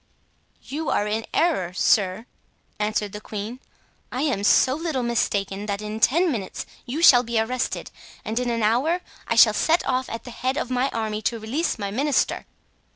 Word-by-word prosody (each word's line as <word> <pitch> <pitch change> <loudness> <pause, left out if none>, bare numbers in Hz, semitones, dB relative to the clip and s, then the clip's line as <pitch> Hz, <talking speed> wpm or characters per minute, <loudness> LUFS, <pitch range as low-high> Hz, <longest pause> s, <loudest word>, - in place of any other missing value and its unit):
"You 305 +2 -4
are 205 - +1
in 215 +1 -2
error, 300 - +1
sir," 190 +2 +2 0.5
answered 210 -1 -1
the 210 - -8
queen. 215 +4 -6 0.5
"I 255 +2 -2
am 255 -10 0
so 255 +5 +5
little 310 -4 -2
mistaken 205 -4 -1
that 200 -1 -2
in 215 +1 -5
ten 335 +9 +3
minutes 205 -8 -4 0.2
you 295 +7 -2
shall 245 -7 +8
be 235 -2 -1
arrested, 250 +3 -2 0.3
and 220 +2 -1
in 250 -1 -1
an 230 -2 -1
hour 270 +12 +2 0.3
I - - 0
shall - - +7
set 330 +2 +2
off 260 0 0
at 230 - -6
the 245 - -9
head 260 +4 -2
of 255 - -3
my 255 +2 +1
army 215 -3 -3
to 230 +2 -1
release 250 +11 -2
my 200 -2 -4
minister." 275 +5 0
235 Hz, 180 wpm, -24 LUFS, 210-265 Hz, 0.5 s, shall